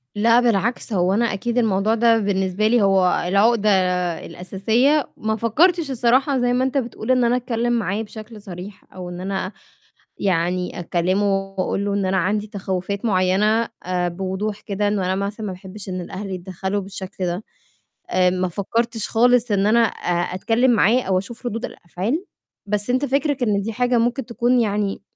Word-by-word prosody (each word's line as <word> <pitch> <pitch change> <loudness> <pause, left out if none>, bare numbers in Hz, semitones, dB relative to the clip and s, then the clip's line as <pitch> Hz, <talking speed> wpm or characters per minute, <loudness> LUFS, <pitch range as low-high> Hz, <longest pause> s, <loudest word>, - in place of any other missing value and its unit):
لأ، 230 +3 +4
بالعكس 235 0 0
هو 185 0 +2
أنا 235 +3 +2
أكيد 235 +5 -2
الموضوع 215 -1 +2
ده 230 0 +4
بالنسبة 195 0 0
لي 240 0 +3
هو 190 -3 +3
العُقدة 210 +3 +3 0.6
الأساسية، 225 +11 +1
ما 220 0 -1
فكَّرتش 305 - +2
الصراحة 260 +3 +2
زي 245 0 +1
ما 255 +1 +2
أنت 265 +2 0
بتقول 240 -1 -2
إن 255 -1 +3
أنا 235 +1 +3
أتكلّم 240 -1 -1
معاه 210 -2 -1
بشَكل 215 0 -10
صريح 185 +1 -9
أو 180 -1 -7
إن 175 0 -7
أنا 190 0 -3 0.7
يعني 180 -1 0
أكلّمه 180 +4 0 0.3
وأقول 195 +1 -1
له 200 0 -1
إن 200 -2 0
أنا 190 0 +1
عندي 205 +4 0
تَخَوّفات 195 0 -4
معيّنة 210 +3 +2 0.2
آآ، 180 -1 0
بوضوح 190 +4 -3
كده 205 0 -1
إنه 200 -3 0
أنا 185 - +1
مثلًا 210 +1 -5
ما 190 - -3
باحبِش 190 +2 -9
إن 185 -1 -3
الأهل 195 +3 -6
يتدخَّلوا 190 +2 -3
بالشَكل 190 -1 -6
ده. 175 +5 -3 0.7
آآ، 180 -1 +3
ما 185 0 -1
فكَّرتش 225 +4 -1
خالص 245 0 +3
إن 200 0 +2
أنا 225 +2 +4
أ 175 -5 0
أتكلّم 230 +6 +2
معاه 235 +2 +4
أو 185 -1 +1
أشوف 235 +5 -7
رُدود 230 0 -3
الأفعال، 210 - -3 0.4
بس 210 +3 -1
أنت 255 +3 +1
فِكرِك 280 0 0
إن 205 -4 +1
دي 225 +2 -3
حاجة 245 +1 +1
ممكن 240 +2 0
تكون 240 +1 +1
يعني 205 -2 -1
210 Hz, 170 wpm, -21 LUFS, 190-235 Hz, 0.7 s, لأ